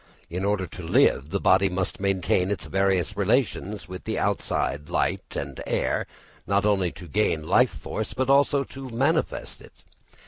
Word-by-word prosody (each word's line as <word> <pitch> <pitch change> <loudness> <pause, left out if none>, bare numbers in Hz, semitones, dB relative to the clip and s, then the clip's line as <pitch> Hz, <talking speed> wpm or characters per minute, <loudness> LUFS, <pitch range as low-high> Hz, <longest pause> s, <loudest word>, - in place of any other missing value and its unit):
In 90 +2 -3
order 100 -2 +1
to 90 - -10
live, 80 -3 +3
the 100 - -1
body 95 +1 +4
must 95 +1 -2
maintain 95 -1 +1
its 100 - -3
various 95 -2 +1
relations 105 -2 0
with 90 0 -8
the - - -2
outside 75 +2 -1
light - - -1
and 70 -2 -5
air - - 0 0.4
not 100 0 +2
only 95 -4 +2
to 90 - -11
gain 80 -4 0
life 125 +7 +5
force, 110 +1 -5
but 130 0 0
also 140 +1 +4
to 135 -1 -9
manifest 115 0 -1
it. - - -18
95 Hz, 165 wpm, -25 LUFS, 90-105 Hz, 0.4 s, life